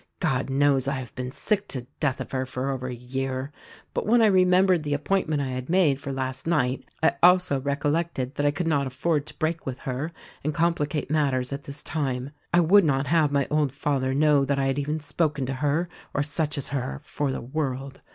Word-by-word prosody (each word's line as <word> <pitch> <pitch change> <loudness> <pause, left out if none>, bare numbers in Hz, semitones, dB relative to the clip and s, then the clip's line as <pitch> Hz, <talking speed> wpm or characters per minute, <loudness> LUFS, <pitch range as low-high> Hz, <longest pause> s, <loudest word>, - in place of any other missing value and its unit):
God 130 +1 0
knows, 135 -1 +3
I 140 - +1
have 130 -3 -6
been 125 0 -5
sick 205 +8 -1
to 125 -3 -5
death 140 -3 0
of 130 - -6
her 130 -1 0
for 130 +1 -2
over 130 -1 -3
a 125 - -4
year; 130 +2 -3 0.4
but - - -2
when 235 +2 +5
I 225 - +6
remembered 185 -2 +4
the 145 -1 -1
appointment 155 -2 0
I 135 - -3
had 130 +2 -5
made 160 -7 +3
for 140 -1 -4
last 130 +1 -4
night 135 -6 0
I 160 - +5
also 180 -6 +5
recollected 145 -1 -1
that 145 - -1
I - - +5
could 145 +4 -2
not 145 -4 +1
afford 145 +3 -1
to - - -13
break 160 0 -2
with 130 -1 -3
her 135 +5 -3 0.3
and 150 0 -1
complicate 155 -4 0
matters 140 -4 +1
at 140 +1 -6
this 140 +1 -6
time. 135 -3 -2 0.2
I 175 - +5
would 195 +5 +6
not 140 -3 +1
have 155 -1 +3
my 140 -1 +1
old 150 -3 +2
father 135 -1 -1
know 150 -1 +4
that 140 0 0
I 135 - +1
had 135 +1 0
even 150 +2 -1
spoken 150 -2 -1
to 135 - -2
her 145 +6 0 0.3
or 145 - +2
such 150 +1 -2
as 140 - -3
her 135 0 -3
for 145 -1 -2
the - - -3
world. 135 0 -4
145 Hz, 220 wpm, -26 LUFS, 135-155 Hz, 0.4 s, I